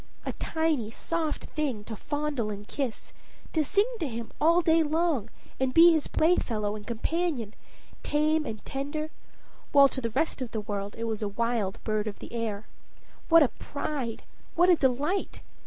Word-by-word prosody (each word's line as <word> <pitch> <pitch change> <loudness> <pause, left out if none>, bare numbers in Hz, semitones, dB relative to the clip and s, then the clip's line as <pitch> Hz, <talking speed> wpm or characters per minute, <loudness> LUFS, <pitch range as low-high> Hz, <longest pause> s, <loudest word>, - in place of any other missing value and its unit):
A - - -2
tiny, 320 -9 0
soft 320 +6 -2
thing 275 -9 -2
to 220 +1 -6
fondle 290 -3 -2
and 205 0 -6
kiss, 265 -6 -4 0.4
to 315 - +3
sing 405 +8 +3
to 320 - -1
him 230 -2 -6
all 335 +3 +5
day 325 0 +4
long, 310 - +1 0.3
and 265 -1 0
be 335 +1 +9
his 315 -3 +1
playfellow 220 -11 +1
and 210 -1 -9
companion, 245 - -1 0.5
tame 305 +1 +2
and 215 -1 -6
tender, 290 +3 -3 0.6
while 280 -1 +8
to 265 - -4
the 230 - -1
rest 270 +4 -1
of 255 - -3
the 220 - -1
world 205 -1 -4
it 230 - -4
was 225 -2 -2
a 210 - 0
wild 225 -1 -1
bird 215 -1 -1
of 205 - -5
the - - -10
air. 220 -3 -3 0.6
What 330 -1 +8
a 265 - +2
pride, 280 -5 -4 0.3
what 355 +2 +5
a - - +7
delight! 290 +7 0
270 Hz, 170 wpm, -28 LUFS, 220-315 Hz, 0.6 s, be